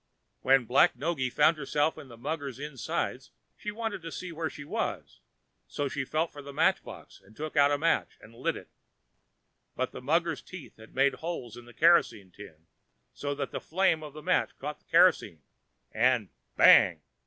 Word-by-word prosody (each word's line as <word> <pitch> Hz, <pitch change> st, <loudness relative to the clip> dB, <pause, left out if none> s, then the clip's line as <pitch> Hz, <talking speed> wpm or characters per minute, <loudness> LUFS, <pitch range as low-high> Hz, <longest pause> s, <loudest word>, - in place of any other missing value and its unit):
When 130 Hz, -1 st, +4 dB
Black 125 Hz, +2 st, +4 dB
Noggy 140 Hz, -1 st, -1 dB
found 150 Hz, +5 st, +3 dB
herself 150 Hz, +2 st, 0 dB
in -, -, -11 dB
the 120 Hz, -2 st, -13 dB
mugger's 140 Hz, 0 st, -4 dB
dark 150 Hz, +2 st, -6 dB
inside, 130 Hz, -5 st, -3 dB, 0.4 s
she 210 Hz, -, -6 dB
wanted 220 Hz, -2 st, -4 dB
to 165 Hz, 0 st, -7 dB
see 180 Hz, +1 st, -6 dB
where 165 Hz, 0 st, -3 dB
she 145 Hz, -, -10 dB
was, 145 Hz, -, -4 dB, 0.5 s
so 145 Hz, -, -3 dB
she 135 Hz, 0 st, -3 dB
felt 155 Hz, +4 st, -1 dB
for 145 Hz, -, -10 dB
the 140 Hz, 0 st, -9 dB
match 140 Hz, -, +2 dB
box, -, -, -12 dB
and 105 Hz, +3 st, -20 dB
took 155 Hz, +1 st, -6 dB
out 145 Hz, -1 st, +5 dB
a 145 Hz, -, +1 dB
match 165 Hz, +3 st, 0 dB
and 110 Hz, -, -16 dB
lit 115 Hz, -, -2 dB
it. -, -, -13 dB, 1.0 s
But 130 Hz, 0 st, -2 dB
the -, -, -9 dB
mugger's 165 Hz, +5 st, 0 dB
teeth 185 Hz, -5 st, -11 dB
had 110 Hz, 0 st, -16 dB
made 135 Hz, +1 st, +3 dB
holes 145 Hz, -9 st, -6 dB
in 120 Hz, 0 st, -12 dB
the 120 Hz, -, -14 dB
kerosene 155 Hz, -, +3 dB
tin, 85 Hz, -5 st, -14 dB, 0.5 s
so 145 Hz, 0 st, -4 dB
that 140 Hz, -1 st, -4 dB
the -, -, -5 dB
flame 175 Hz, -2 st, +1 dB
of 150 Hz, -2 st, -9 dB
the 155 Hz, -, -10 dB
match -, -, 0 dB
caught -, -, -6 dB
the -, -, -38 dB
kerosene, 80 Hz, -4 st, +3 dB, 0.5 s
and 120 Hz, -3 st, +2 dB, 0.3 s
BANG!! -, -, +6 dB
145 Hz, 190 wpm, -29 LUFS, 125-160 Hz, 1.0 s, BANG